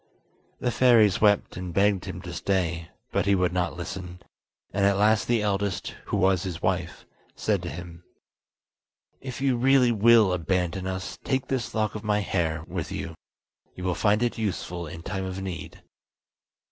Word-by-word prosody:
The 125 - 0
fairies 115 -6 +5
wept 105 -1 +3
and 90 -1 -6
begged 100 -1 +2
him 90 +2 -7
to 85 -3 -7
stay, 85 -2 -1 0.2
but - - 0
he 100 - +5
would 90 -2 +1
not 90 -1 -1
listen, 90 0 -6 0.5
and 100 +1 +1
at 100 0 +4
last 105 +1 +3
the 120 -3 +2
eldest, 100 -2 -1
who - - -1
was 95 -2 +3
his 90 -3 -4
wife, 90 -1 -2 0.3
said - - 0
to - - -5
him: 85 +2 -9 1.2
"If 135 +1 -7
you 135 -3 +2
really 130 0 +4
will 110 -3 +5
abandon 90 +1 -1
us, 95 0 -5
take 130 -1 -1
this 130 -3 -2
lock 110 -1 0
of 105 - -6
my 105 -1 +1
hair 80 -5 -1
with 90 0 -4
you; 95 -3 -4 0.6
you 90 - -8
will 90 -1 +1
find 105 +4 +2
it 120 -1 -1
useful 90 -5 -3
in 80 +1 -9
time 95 0 -3
of 95 0 -5
need." 95 -2 -7
95 Hz, 170 wpm, -26 LUFS, 90-105 Hz, 1.2 s, fairies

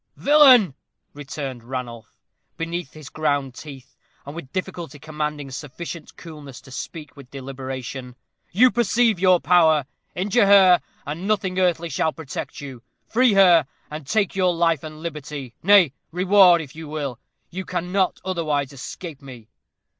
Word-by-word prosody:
"Villain," 265 - +6 0.4
returned 135 -3 -7
Ranulph, 120 -2 -7 0.5
between 170 0 -4
his 155 -2 -12
ground 145 -4 -1
teeth, 135 -2 -12 0.3
and 145 +2 -8
with 140 -6 -9
difficulty 175 -5 -5
commanding 150 -1 -5
sufficient 155 +4 -8
coolness 150 -6 -11
to 130 - -16
speak 150 +3 -8
with 140 -3 -14
deliberation, 130 -2 -7 0.4
"you 245 +7 +5
perceive 235 -3 +2
your 185 -1 +4
power. 160 -6 +4 0.3
Injure 200 +4 +2
her, 190 -3 +7 0.2
and 160 +6 -5
nothing 190 -3 0
earthly 170 -2 +1
shall 160 +2 0
protect 150 -3 -7
you. 135 -4 -9 0.2
Free 245 -1 +3
her, 175 -7 +6 0.2
and 150 -2 -7
take 205 0 0
your 185 -2 +2
life 165 -3 +1
and 155 0 -9
liberty; 150 -5 -6
nay, 190 -6 +5 0.2
reward 180 -1 +5
if 145 -3 -11
you 160 -1 -8
will. 145 -5 -5 0.3
You 190 +2 -5
cannot 180 +1 -1
otherwise 150 -7 -1
escape 145 +3 -8
me." 125 -5 -12
160 Hz, 140 wpm, -22 LUFS, 140-185 Hz, 0.5 s, her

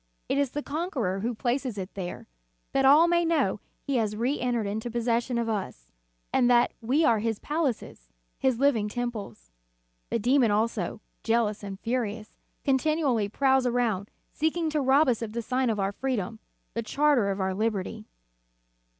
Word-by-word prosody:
It 280 - +1
is 280 -2 +2
the 295 - -3
Conqueror 280 - -2
who 235 +4 -2
places 245 0 -1
it 190 0 -5
there, 180 -3 -6 0.4
that 270 0 +2
all 300 +5 +7
may 345 0 +3
know 300 - +1 0.2
He 275 -2 0
has 215 -2 0
reentered 240 -1 0
into 220 +4 -3
possession 235 +1 0
of 235 -1 0
us, 185 - -4 0.4
and 245 -2 +4
that 240 0 +4
we 270 +8 +2
are 225 - +4
His 225 0 -1
palaces, 275 - -3 0.3
His 260 -3 +2
liv 280 +1 +4
ing 210 -1 -1
temples. 210 - -5 0.6
The - - +1
demon 245 +2 +3
also, 210 -2 -1 0.2
jealous 225 -2 +1
and 195 -2 -7
furious, 225 -2 -3 0.3
continually 270 -5 +1
prowls 265 +2 +2
around, 230 -5 0 0.2
seeking 320 +1 0
to 300 -1 +1
rob 275 +3 +4
us 240 -3 +1
of 220 -2 -4
the 235 - -2
sign 255 +1 0
of 215 -2 -1
our 195 0 0
freedom, 225 -3 -3 0.3
the 230 - -1
charter 275 -2 +2
of 195 0 -2
our 190 0 0
liberty." 215 +1 -2
235 Hz, 165 wpm, -27 LUFS, 210-270 Hz, 0.6 s, all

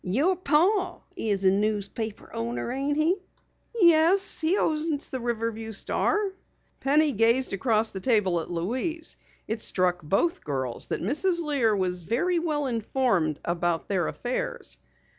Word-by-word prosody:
"Your 280 - +2
pa's 365 +3 +2 0.4
a 190 - +5
newspaper 210 +1 -2
owner, 120 - -3
ain't 275 +3 -1
he?" 325 +5 +2 0.6
"Yes, 345 +2 +4
he 330 +5 +2
owns 310 -3 0
the 260 - -3
Riverview 230 -2 -3
Star." 410 - +1 0.5
Penny 295 +2 +3
gazed 230 +2 +2
across 220 +2 +1
the 190 - -5
table 195 -6 +2
at 165 - -6
Louise. 255 - -1 0.3
It 220 +1 -3
struck 180 -1 +1
both 195 - 0
girls 130 -4 -3
that - - -3
Mrs. 340 - +1
Lear 265 -8 +2
was 180 -3 -2
very 340 - +1
well 305 -3 -1
informed 225 - 0
about 170 -1 -1
their 185 -5 +1
affairs. - - -4
235 Hz, 135 wpm, -26 LUFS, 190-315 Hz, 0.6 s, a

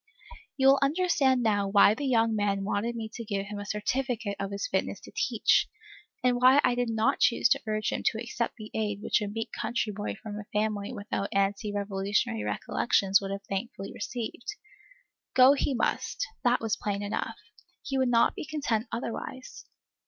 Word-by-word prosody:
You 265 - +1
will 270 0 +7
understand 275 -4 +2
now 205 -3 +2
why 200 +1 +6
the 280 +5 -3
young 230 -3 +3
man 200 -2 0
wanted 210 +4 -1
me 225 -1 -4
to 235 - -6
give 200 -2 -3
him 205 0 -6
a 205 - -7
certificate 225 0 -2
of 195 0 -2
his 200 0 -3
fitness 190 - -1
to - - -12
teach, - - +2 0.6
and 250 -1 +3
why 260 +3 +7
I 245 - +3
did 245 -1 -1
not 220 0 +1
choose 235 - +4
to - - +3
urge 215 0 0
him - - -2
to 220 - +1
accept 235 +1 -3
the 215 -2 -10
aid 210 -2 -2
which - - +2
a 210 - -2
meek 225 +2 -4
country 220 -1 -2
boy 205 +1 -4
from 210 -1 -7
a 210 - -8
family 210 0 -1
without 205 -3 -3
ante 200 +2 0
Revolutionary 200 - -1
recollections 195 - +1
would 195 - -4
have 200 0 -4
thankfully 195 0 -5
received. 240 - -5 0.8
Go 260 +2 +8
he 280 -1 0
must, 375 - -1 0.2
that 245 -1 +3
was 225 -2 0
plain 205 -1 -3
enough. 205 - -3 0.5
He 270 -2 -2
would 260 -1 +2
not 235 -1 +4
be - - -6
content 260 -7 -1
otherwise. 235 +2 -6
220 Hz, 185 wpm, -28 LUFS, 205-245 Hz, 0.8 s, Go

